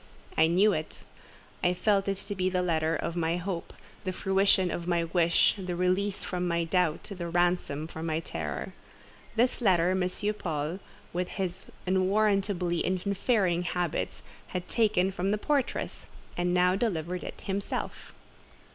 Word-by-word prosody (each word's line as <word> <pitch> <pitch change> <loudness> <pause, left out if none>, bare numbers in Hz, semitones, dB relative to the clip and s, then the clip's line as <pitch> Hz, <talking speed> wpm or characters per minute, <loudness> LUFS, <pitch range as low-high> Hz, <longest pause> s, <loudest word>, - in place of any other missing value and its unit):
I 160 - +5
knew 195 +5 +4
it, 155 -2 -5 0.6
I 180 0 +3
felt 200 +1 +2
it 195 -1 0
to 200 +1 -4
be 185 -1 0
the 180 -1 0
letter 160 -2 +1
of 170 - -3
my 170 0 +1
hope, 180 -1 -4 0.3
the 185 - -1
fruition 190 -1 +2
of 175 0 -4
my 170 -1 +2
wish, 170 0 +3
the 180 -2 -3
release 185 +3 +1
from 180 -1 -2
my 170 -1 +1
doubt, 165 -1 +1
the 180 -4 -5
ransom 175 -4 +1
from 160 0 -6
my 160 0 0
terror. 80 - -4 0.6
This 245 +2 +2
letter 180 -5 +4
M. 185 -1 +1 0.3
Paul, 160 +1 -2 0.3
with 180 +1 -1
his 190 -1 -4 0.2
unwarrantably 190 -2 +2
interfering 190 -1 +1
habits, 175 -2 -2 0.2
had 180 -1 -4
taken 205 -5 +2
from 190 0 -1
the 210 - +2
portress, 280 +4 -1 0.3
and 175 0 0
now 180 +1 +4
delivered 180 -5 -1
it - - -7
himself. 200 +1 -4
180 Hz, 150 wpm, -29 LUFS, 170-195 Hz, 0.6 s, I